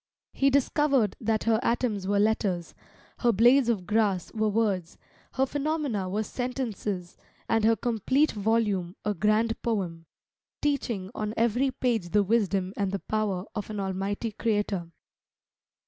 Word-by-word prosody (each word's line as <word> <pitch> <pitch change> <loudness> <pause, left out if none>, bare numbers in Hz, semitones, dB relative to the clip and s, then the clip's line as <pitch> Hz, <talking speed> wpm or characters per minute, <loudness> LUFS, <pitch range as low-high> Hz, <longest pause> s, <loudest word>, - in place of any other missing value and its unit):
He 275 - +3
discovered 275 -4 +2
that 220 -1 0
her 225 -1 +3
atoms 230 -6 0
were 200 0 +2
letters, 200 -5 +1 0.5
her 240 - +3
blades 240 +4 +5
of 205 -6 0
grass 205 -3 +1
were 220 -1 +1
words, 200 -5 0 0.4
her 265 - +2
phenomena 285 -9 -2
were 210 +3 -1
sentences, 220 -8 -4 0.3
and 225 -1 +2
her 225 0 +5
complete 245 +6 +1
volume 205 -4 0
a 210 - +1
grand 215 +2 +1
poem, 175 -8 -2 0.5
teaching 235 -10 -1
on 215 +1 -3
every 235 +4 +2
page 235 -8 -1
the 205 +3 +3
wisdom 195 -3 +1
and 200 -2 -1
the 200 - -1
power 200 -3 -2
of 210 -2 -5
an 210 -1 -4
Almighty 195 +3 -2
Creator. 205 -5 -1
215 Hz, 140 wpm, -27 LUFS, 195-235 Hz, 0.5 s, blades